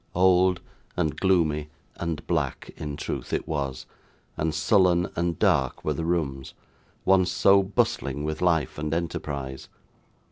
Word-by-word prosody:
Old, 90 Hz, 0 st, +4 dB, 0.4 s
and 75 Hz, -, 0 dB
gloomy, 80 Hz, -6 st, +1 dB, 0.3 s
and 85 Hz, -3 st, -4 dB
black, -, -, -2 dB
in 75 Hz, -1 st, -5 dB
truth -, -, -5 dB
it -, -, -2 dB
was, 70 Hz, -4 st, -3 dB, 0.5 s
and 80 Hz, +1 st, -1 dB
sullen 90 Hz, +3 st, +3 dB
and 85 Hz, -1 st, -1 dB
dark 65 Hz, -2 st, +1 dB
were 75 Hz, -, +1 dB
the 80 Hz, +3 st, -3 dB
rooms, 70 Hz, -6 st, -2 dB, 0.5 s
once 95 Hz, -2 st, +4 dB
so 100 Hz, +2 st, +5 dB
bustling 75 Hz, -7 st, -1 dB
with 75 Hz, 0 st, -3 dB
life 80 Hz, -5 st, +1 dB
and 75 Hz, +1 st, -1 dB
enterprise. 70 Hz, -5 st, -4 dB
80 Hz, 135 wpm, -26 LUFS, 75-90 Hz, 0.5 s, so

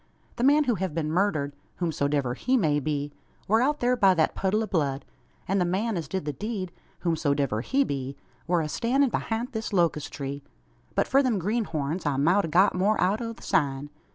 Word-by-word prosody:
The 235 Hz, -, -1 dB
man 290 Hz, +3 st, +5 dB
who 250 Hz, -4 st, +1 dB
hev 185 Hz, -5 st, -3 dB
been 155 Hz, -2 st, -1 dB
murdered, 155 Hz, -6 st, 0 dB, 0.2 s
whosomdiver 145 Hz, -6 st, 0 dB
he 255 Hz, -, +1 dB
may 150 Hz, -9 st, +2 dB
be, 145 Hz, 0 st, -3 dB, 0.3 s
war 220 Hz, +3 st, +4 dB
out 290 Hz, +3 st, +1 dB
thur 245 Hz, +1 st, +3 dB
by 195 Hz, -6 st, +4 dB
thet 160 Hz, -2 st, +2 dB
puddle 205 Hz, +3 st, 0 dB
o' -, -, -1 dB
blood, 145 Hz, -8 st, -1 dB, 0.4 s
an 195 Hz, +1 st, +1 dB
the -, -, +3 dB
man 195 Hz, +6 st, 0 dB
as 165 Hz, -4 st, -3 dB
did 190 Hz, 0 st, -3 dB
the 150 Hz, -, -2 dB
deed, 205 Hz, -2 st, -4 dB, 0.3 s
whosomdiver 140 Hz, -9 st, 0 dB
he 275 Hz, -, +2 dB
be, 135 Hz, -, -4 dB, 0.3 s
war 175 Hz, -1 st, +2 dB
a 155 Hz, -, -2 dB
stannin' 250 Hz, -, +1 dB
behint 230 Hz, +4 st, -2 dB
this 220 Hz, -2 st, -4 dB
locust 170 Hz, -6 st, +1 dB
tree. 140 Hz, 0 st, -5 dB, 0.5 s
But -, -, +2 dB
for 275 Hz, -, +4 dB
them 250 Hz, -6 st, +1 dB
greenhorns, 175 Hz, -6 st, -2 dB
I 140 Hz, -2 st, 0 dB
mout 175 Hz, +8 st, +3 dB
a -, -, -3 dB
got 185 Hz, +5 st, +4 dB
more 200 Hz, +4 st, +1 dB
out 200 Hz, +5 st, +2 dB
o' 230 Hz, -1 st, -3 dB
the -, -, -16 dB
sign. 140 Hz, -1 st, 0 dB
180 Hz, 205 wpm, -26 LUFS, 145-220 Hz, 0.5 s, man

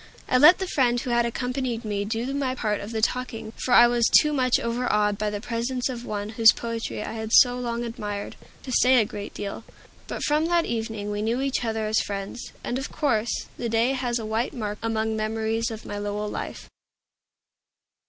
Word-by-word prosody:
I 255 Hz, -, +3 dB
let 310 Hz, +6 st, +8 dB
the 380 Hz, -, -2 dB
friend 250 Hz, -8 st, +2 dB
who 245 Hz, -, -4 dB
had 235 Hz, 0 st, +3 dB
accompanied 250 Hz, -1 st, -3 dB
me 205 Hz, -1 st, -2 dB
do 230 Hz, +5 st, -2 dB
my 270 Hz, -2 st, -1 dB
part 210 Hz, -4 st, -1 dB
of 205 Hz, -, -7 dB
the 220 Hz, -1 st, -3 dB
talking 230 Hz, -3 st, -2 dB
for 250 Hz, -, -5 dB
I 240 Hz, -, +9 dB
was 240 Hz, -1 st, +3 dB
too 300 Hz, -1 st, 0 dB
much 255 Hz, -3 st, +2 dB
overawed 230 Hz, -3 st, +1 dB
by 210 Hz, 0 st, 0 dB
the 205 Hz, 0 st, -4 dB
presence 240 Hz, +3 st, -2 dB
of 245 Hz, -2 st, -6 dB
one 205 Hz, 0 st, -3 dB
whose 225 Hz, 0 st, +6 dB
poetry 230 Hz, -2 st, -4 dB
I -, -, -5 dB
had 220 Hz, -1 st, -5 dB
so 245 Hz, +1 st, +6 dB
long 235 Hz, -1 st, -2 dB
admired, 210 Hz, -4 st, -5 dB, 0.3 s
to 260 Hz, -, -6 dB
say 255 Hz, +1 st, +5 dB
a 220 Hz, -, +3 dB
great 205 Hz, 0 st, -7 dB
deal. 205 Hz, +2 st, -5 dB, 0.4 s
But -, -, -4 dB
from 300 Hz, +2 st, +2 dB
that 340 Hz, -1 st, +2 dB
evening 220 Hz, -3 st, -3 dB
we 205 Hz, 0 st, -2 dB
knew 230 Hz, +3 st, 0 dB
each 275 Hz, -2 st, -1 dB
other 220 Hz, -1 st, -1 dB
as 215 Hz, +1 st, +2 dB
friends; 200 Hz, +4 st, -5 dB
and, 245 Hz, -, -2 dB
of 265 Hz, -, -6 dB
course, 235 Hz, -7 st, 0 dB
the 235 Hz, -, -3 dB
day 230 Hz, +3 st, +2 dB
has 250 Hz, -3 st, -1 dB
a 225 Hz, -, -5 dB
white 220 Hz, +5 st, -1 dB
mark 210 Hz, -3 st, -4 dB
among 220 Hz, -1 st, -1 dB
memories 220 Hz, +1 st, -1 dB
of 220 Hz, -1 st, -8 dB
my 205 Hz, -, -5 dB
Lowell 205 Hz, +1 st, -3 dB
life. -, -, -6 dB
230 Hz, 205 wpm, -25 LUFS, 215-250 Hz, 0.4 s, I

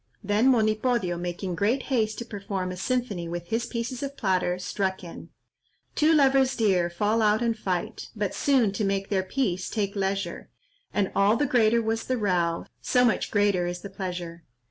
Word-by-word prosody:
Then 205 Hz, +5 st, +2 dB
Monipodio, 215 Hz, -4 st, +2 dB
making 175 Hz, +1 st, -4 dB
great 220 Hz, +9 st, +1 dB
haste 220 Hz, -3 st, +1 dB
to 235 Hz, -, -5 dB
perform 195 Hz, -4 st, -4 dB
a -, -, -5 dB
symphony 200 Hz, -3 st, -2 dB
with 175 Hz, 0 st, -6 dB
his 230 Hz, +1 st, -1 dB
pieces 240 Hz, +1 st, -4 dB
of 280 Hz, 0 st, -5 dB
platter, 185 Hz, -3 st, +1 dB
struck 190 Hz, 0 st, -2 dB
in— 170 Hz, -, -10 dB, 0.6 s
"Two 310 Hz, +1 st, +3 dB
lovers 270 Hz, -3 st, +4 dB
dear, 185 Hz, -6 st, +2 dB
fall 210 Hz, +6 st, +1 dB
out 215 Hz, +2 st, +3 dB
and 230 Hz, -1 st, +1 dB
fight, 195 Hz, +1 st, -3 dB
But 205 Hz, -3 st, -2 dB
soon, 260 Hz, -7 st, +2 dB
to 205 Hz, +2 st, -2 dB
make 195 Hz, 0 st, -1 dB
their 195 Hz, -2 st, +1 dB
peace, 185 Hz, -3 st, -2 dB
take 200 Hz, -2 st, -2 dB
leisure; 195 Hz, 0 st, -2 dB, 0.4 s
And 200 Hz, -2 st, 0 dB
all 205 Hz, +3 st, +4 dB
the 290 Hz, -, +1 dB
greater 235 Hz, -2 st, +3 dB
was 225 Hz, +1 st, -1 dB
the 255 Hz, -, -1 dB
row, 175 Hz, -6 st, 0 dB, 0.2 s
So 250 Hz, -1 st, +3 dB
much 230 Hz, -, +1 dB
the -, -, -15 dB
greater 200 Hz, -4 st, +2 dB
is 175 Hz, 0 st, -4 dB
the 200 Hz, -, -8 dB
pleasure." 175 Hz, -3 st, -5 dB
205 Hz, 185 wpm, -26 LUFS, 185-235 Hz, 0.6 s, lovers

